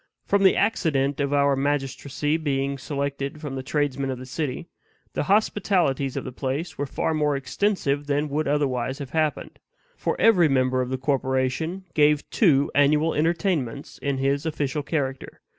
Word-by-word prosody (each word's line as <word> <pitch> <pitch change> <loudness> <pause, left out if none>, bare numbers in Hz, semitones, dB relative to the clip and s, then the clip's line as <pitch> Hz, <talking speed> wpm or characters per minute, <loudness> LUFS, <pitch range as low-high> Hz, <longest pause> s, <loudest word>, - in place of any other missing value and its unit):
From 200 - +2
the 190 -1 +5
accident 145 -9 +1
of 140 -1 0
our 140 -1 +3
magistracy 140 +1 -1
being 140 -3 -1
selected 140 +1 -3
from 150 -3 -6
the 135 - -3
tradesmen 140 0 -1
of 130 - -3
the 130 - -8
city, 130 0 -4 0.5
the - - -1
hospitalities 180 -9 +1
of - - -2
the 130 - -6
place 145 +6 -3
were 145 0 -3
far 160 - -1
more 150 -2 +1
extensive 145 0 -1
than 145 +1 0
would 150 +2 -1
otherwise 135 -3 0
have 140 -3 -7
happened; 155 -2 -1 0.4
for - - -2
every 190 -8 +5
member 130 -2 +2
of 125 - -3
the 130 - -1
corporation 135 +6 -1
gave 150 -1 +3
two 145 - +3
annual 150 +3 +3
entertainments 155 - -1
in 140 -1 -1
his 140 +2 0
official 150 -2 -2
character. 140 -3 -3
145 Hz, 160 wpm, -24 LUFS, 135-155 Hz, 0.5 s, the